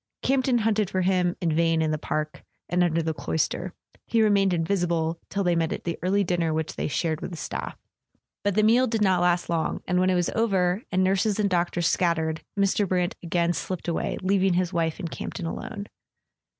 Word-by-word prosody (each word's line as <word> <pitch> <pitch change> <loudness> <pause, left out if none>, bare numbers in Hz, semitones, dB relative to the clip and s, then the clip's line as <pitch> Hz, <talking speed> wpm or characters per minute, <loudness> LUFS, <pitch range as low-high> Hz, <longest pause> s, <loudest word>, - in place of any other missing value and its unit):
Campton 260 -1 +2
hunted 215 -3 +1
for 185 - 0
him 180 -1 +1
in 165 -3 +1
vain 165 0 +2
in 160 -1 +1
the 155 - 0
park, 155 +1 -3 0.2
and 180 0 +2
under 165 -1 +1
the 160 0 -1
cloister; 160 +4 -2 0.4
he 230 -1 +3
remained 200 -2 +3
invisible 170 -2 0
till 200 0 -1
they 175 -2 +2
met 165 -1 0
at - - -4
the 170 - -3
early 195 +3 +2
dinner 170 -3 0
which 160 0 -3
they - - -2
shared 155 +1 -1
with - - -4
the 170 - -7
staff. - - -5 0.7
But 200 -2 0
the 215 - +3
meal 240 +4 +4
did 220 -2 0
not 185 -3 +3
last 175 0 +2
long, 165 -2 -1
and 180 0 +2
when 185 +1 +3
it 185 - +2
was 175 -1 +1
over, 195 -4 +1
and 185 0 +2
nurses 195 +2 +1
and 200 -2 +1
doctors 175 -1 0
scat¬ 170 -2 +2
tered, 160 -1 -2 0.2
Mr. 200 0 +2
Brant 180 -1 0
again 170 0 0
slipped 185 0 -4
away, 170 - -1
leaving 190 -1 +2
his 180 0 0
wife 165 0 -1
and 170 -4 -5
Campton 180 - -5
alone. 200 +5 -5
180 Hz, 210 wpm, -25 LUFS, 165-195 Hz, 0.7 s, meal